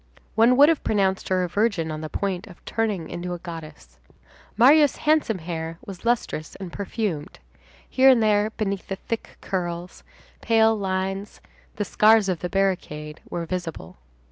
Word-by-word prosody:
One 235 +3 +4
would 285 +1 +8
have 325 -2 +2
pronounced 195 -2 0
her 185 -1 +2
a - - -1
virgin 200 -4 0
on 155 0 -5
the 155 - -5
point 195 +2 -3
of 180 - -16
turning 210 -7 -1
into 175 +1 -5
a - - -6
goddess. 155 - -10 0.6
Marius' 285 +4 +6
handsome 300 -9 +3
hair 165 -1 -5
was 195 -3 -9
lustrous 230 -9 -1
and 190 -3 -8
perfumed; 200 -6 -3 0.5
here 265 0 +5
and 245 -4 +5
there, 210 0 +3
beneath 200 -3 -3
the 195 - -3
thick 225 +3 -6
curls, 175 -1 -4 0.4
pale 225 -1 +4
lines—the 195 +1 -4
scars 215 +1 +4
of 180 -3 -1
the 180 - -4
barricade—were 170 -4 -2
visible. 165 - -6
190 Hz, 150 wpm, -24 LUFS, 170-220 Hz, 0.6 s, would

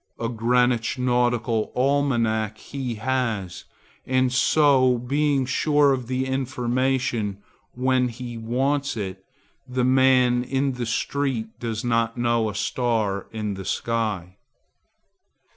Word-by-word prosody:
A 115 - -1
Greenwich 120 +1 +1
nautical 120 -3 +1
almanac 120 -6 +1
he 130 0 -5
has, 110 -6 -2 0.4
and 130 -1 +2
so 130 -2 +4
being 140 +2 +1
sure 145 +2 +3
of 130 -3 -4
the 130 +1 -1
information 130 -4 -1 0.4
when 130 0 +2
he 120 0 -7
wants 130 +4 -1
it, 95 -2 -5 0.4
the 125 0 0
man 130 -1 +4
in 135 +2 0
the 125 -2 -4
street 125 0 -1
does 115 -2 -3
not 115 0 0
know 120 -2 +1
a 105 - -7
star 110 -4 -1
in 105 -2 -3
the 95 0 -7
sky. 100 -4 -2
125 Hz, 115 wpm, -24 LUFS, 115-130 Hz, 0.4 s, so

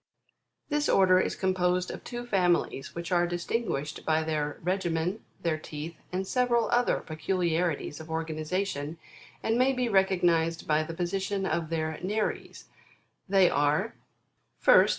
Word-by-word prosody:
25. 295 - -1
This 295 - 0
order 185 -1 +5
is - - 0
composed 180 -1 +1
of - - -8
two 240 0 -6
families 180 - +1
which 170 0 -5
are 175 -1 +3
distin 175 +7 -2
guished 150 +2 -3
by 160 0 +2
their 150 -2 -2
regimen, 180 +1 -1 0.2
their 160 -2 0
teeth 155 +2 -7 0.2
and 185 +1 -2
several 240 +1 +1
other 245 +1 +2
peculiari 170 0 0
ties 145 - -7
of 160 0 -10
organization, 160 0 -2 0.5
and 225 +2 +1
may 265 +1 +4
be 250 -1 0
recognised 175 -5 +2
by 155 0 +3
the 165 +1 -5
position 190 +3 -1
of 160 -2 -1
their 160 -1 -2
nares; 210 +4 -2 0.6
they 195 -2 +6
are: 150 +10 +1 0.7
1st. - - +7
175 Hz, 150 wpm, -28 LUFS, 160-195 Hz, 0.7 s, 1st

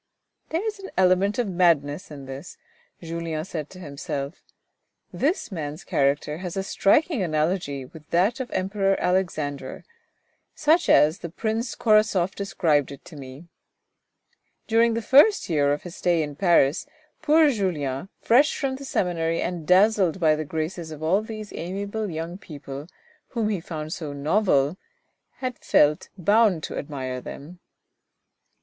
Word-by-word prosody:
" - - -48
There 335 +6 -1
is 435 -2 -3
an 390 - -8
element 190 +2 +3
of 245 -3 0
madness 170 -4 +1
in 140 -3 -9
this," 135 +6 -9 0.5
Julien 165 -1 -4
said 155 -6 -5
to 185 - -12
himself. 140 -1 -5 0.7
This 305 - -1
man's 155 -2 -5
character 145 +2 0
has 180 0 -5
a 195 - 0
striking 265 - +2
analogy 155 -4 -1
with 150 +3 -15
that 195 +9 +2
of 260 - -3
the - - -8
Emperor 195 +1 0
Alexander, 155 -7 -2 0.7
such 320 +3 +3
as 155 +4 +5
the 170 - -6
Prince 225 +6 -2
Korasoff 215 -5 +3
described 160 -8 0
it 140 - -11
to 165 - -12
me. 135 +3 -10 1.2
During 230 0 +3
the 230 - -2
first 295 - +5
year 145 -2 +3
of 145 - -2
his 175 -1 -9
stay 170 -3 +2
in 145 -1 -6
Paris 165 -3 +3 0.3
poor 310 -1 +5
Julien, 170 - -2
fresh 270 +6 +4
from 265 -2 -2
the 275 - -9
seminary 165 -7 0
and 170 -3 -3
dazzled 190 -1 +4
by 155 -3 +4
the 155 - -3
graces 160 +2 -4
of 155 0 -8
all 185 +6 +3
these 215 -1 -8
amiable 200 +4 -4
young 165 +3 -5
people, 145 -3 -9 0.4
whom 225 -4 -1
he 205 -4 -1
found 155 -2 -5
so 150 -4 -5
novel, 150 0 +1 0.6
had 255 -2 -5
felt 150 +1 +3
bound 205 -2 +3
to - - -5
admire 130 -3 -5
them. 165 +8 -10
175 Hz, 150 wpm, -24 LUFS, 150-210 Hz, 1.2 s, as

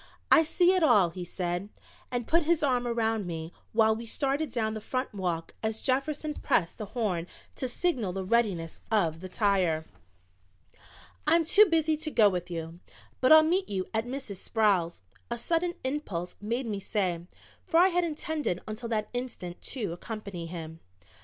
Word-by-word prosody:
"I - - +8
see 350 +3 +3
it 370 - +2
all," 210 - +5
he 180 +1 -6
said, 175 +2 -3 0.4
and 245 -2 -2
put 335 +7 +3
his 325 0 +1
arm 250 -3 +2
around 225 -4 0
me 165 -1 -5 0.2
while 220 0 +4
we 230 +1 -7
started 280 +5 -1
down 220 -3 -1
the 215 - -5
front 255 +3 -3
walk 175 -4 -3
as 220 0 -2
Jefferson 290 +3 -1
pressed 170 - 0
the 215 - -4
horn 180 -7 0 0.3
to 260 - -2
signal 245 - 0
the 190 +1 -3
readiness 195 -7 0
of 170 -8 +1
the 185 +1 -8
tire. 185 -6 +1 1.4
"I'm 330 +1 +4
too 415 +6 +7
busy 320 -2 +2
to 310 +1 -4
go 220 -8 +5
with 180 -2 -3
you, 165 0 -6 0.4
but 255 - +3
I'll 315 0 +10
meet 360 +5 +1
you 190 -2 -1
at 220 +2 0
Mrs. 255 -6 -5
Sproul's," 185 - +1 0.3
a 235 - -2
sudden 340 +7 0
impulse 260 - -3
made 235 +5 -2
me 210 -3 -3
say, 185 -4 -2 0.4
for 330 - +2
I 370 +2 +6
had 355 -1 +1
intended 310 - -2
until 220 +2 -5
that 215 -2 -1
instant 245 -8 -5
to 210 -10 -3
accompany 195 -3 -6
him. 165 -1 -7
220 Hz, 170 wpm, -29 LUFS, 180-280 Hz, 1.4 s, I'll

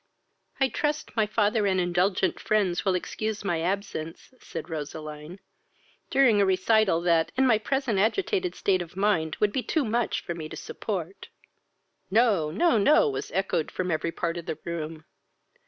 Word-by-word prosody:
"I 270 - +4
trust, 300 +3 -2
my 220 -2 +2
father 210 0 +1
and 190 -1 +2
indulgent 180 +2 +1
friends 195 -5 +1
will 190 -2 +2
excuse 215 +4 -3
my 175 -5 -1
absence, 180 +1 -4
(said 165 -1 -7
Roseline,) 155 +2 -7 0.7
during 235 -7 +4
a - - +5
recital, 190 -1 +3
that, 170 -2 +2
in 265 - +4
my 225 -4 +4
present 265 -3 0
agitated 365 - 0
state 185 -2 +1
of 175 +1 -9
mind, 195 -6 +1
would 210 -1 +2
be 260 - 0
too 300 +2 0
much 235 +1 0
for 170 - -4
me 160 -2 -7
to - - -8
support." 190 -3 -5 0.8
"No, 205 -7 +3
no, 230 - +2
no!" 280 - +5
was 135 - -4
echoed 185 -3 0
from 185 -1 -3
every 165 +1 -1
part 170 0 -2
of 170 - -7
the 155 - -3
room. 160 -2 -5
190 Hz, 165 wpm, -27 LUFS, 165-220 Hz, 0.8 s, a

